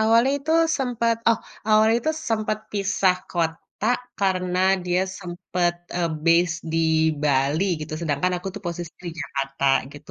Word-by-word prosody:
awalnya 230 +5 +4
itu 310 +3 -2 0.3
sempet 235 -3 +1
oh 230 - +4 0.3
awalnya 220 +1 +5
itu 315 - +2 0.2
sempet 215 -1 0
pisah 195 -2 +2
kota 165 +4 -3 0.3
karena 185 -2 0 0.2
dia 180 0 +1 0.2
sempet, 175 -1 -1 0.2
eee, 170 -1 +1 0.2
base 165 0 +4 0.2
di 165 - +1 0.4
Bali 145 +4 +2 0.2
gitu 155 0 -6
sedangkan 165 +2 0
aku 185 +2 -5
tuh 205 - -6
posisi 170 -1 -5
di - - -2
Jakarta 135 -1 -3 0.3
gitu, 145 +1 -13
180 Hz, 145 wpm, -24 LUFS, 165-215 Hz, 0.4 s, awalnya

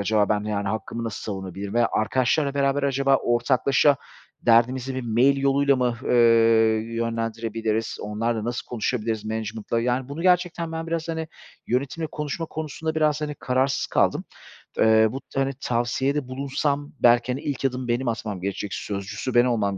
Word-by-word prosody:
acaba 105 0 +2
ben 105 -1 +1
yani 100 -2 -2
hakkımı 110 +3 -4
nasıl 115 - -5
savunabilirim 95 0 -5
veya 120 -1 +3
arkadaşlarla 130 +6 +1
beraber 140 0 +1
acaba 135 0 +3
ortaklaşa 130 +4 +2 0.5
derdimizi 125 +3 +3
bir 130 - -3
mail 120 +4 +3
yoluyla 140 0 +3
mı, 125 -2 0
eee, - - +1 0.8
yönlendirebiliriz? 115 -1 -2
Onlarla 110 +2 -2
nasıl 120 +1 -3
konuşabiliriz, 110 -2 -2
management'la? 110 +1 -3
Yani, 125 +2 -1
bunu 150 +4 -5
gerçekten 175 -2 +1
ben 165 0 -4
biraz, 165 0 -3
hani, 160 -1 -3 0.4
yönetimle 140 +6 -1
konuşma 150 +2 -4
konusunda 160 0 -4
biraz, 155 -1 +2
hani, 150 -1 -3
kararsız 130 0 0
kaldım. - - +1 0.6
Eee, 110 0 +5
bu 135 - -5
t 135 - -5
hani, 135 0 +1
tavsiyede 125 +4 0
bulunsam 140 +2 -2
belki, 120 0 +4
hani, 130 +3 -3
ilk 140 -2 -3
adımı 125 -1 -1
benim 120 +2 0
atmam 105 -4 -3
gerekecek, 100 +1 -4
sözcüsü 105 +5 -4
ben 120 0 +5
olmam 105 -5 0
125 Hz, 155 wpm, -24 LUFS, 110-140 Hz, 0.8 s, Eee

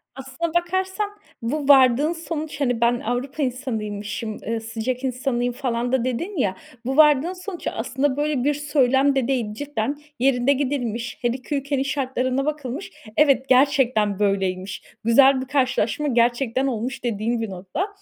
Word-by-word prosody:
Aslına 270 +5 -4
bakarsan 375 +4 0 0.3
bu 275 +5 -2
vardığın 275 +2 +6
sonuç, 315 -3 -5
hani, 245 -4 0
ben 240 +1 +3
"Avrupa 255 +6 -2
insanıymışım, 220 -4 -3
eee, 230 0 -1
sıcak 230 +3 -4
insanıyım" 250 -1 -1
falan 245 -2 -2
da 260 -2 +1
dedin 335 - -3
ya, 200 -9 +1 0.3
bu 265 +3 -1
vardığın 300 +2 +5
sonuç 365 -1 -7
aslında 265 +4 -1
böyle 295 -3 0
bir 295 +2 +2
söylem 280 -2 +2
de 260 -3 +1
değil. 240 -6 -1
Cidden 280 +1 -3 0.2
yerinde 260 +1 +3
gidilmiş, 245 -4 -2
her 240 - +2
2 255 +4 -3
ülkenin 275 -1 -1
şartlarına 265 -1 -1
bakılmış; 295 +1 -4 0.3
evet, 275 -3 +4
gerçekten 255 -6 +3
böyleymiş, 195 -2 -1 0.2
güzel 265 +4 +5
bir - - -4
karşılaşma 265 0 +1
gerçekten 240 +1 +1
olmuş 250 +1 -3
dediğin 230 0 -1
bir 225 - -3
nokta. 190 - -4
260 Hz, 145 wpm, -23 LUFS, 235-285 Hz, 0.3 s, vardığın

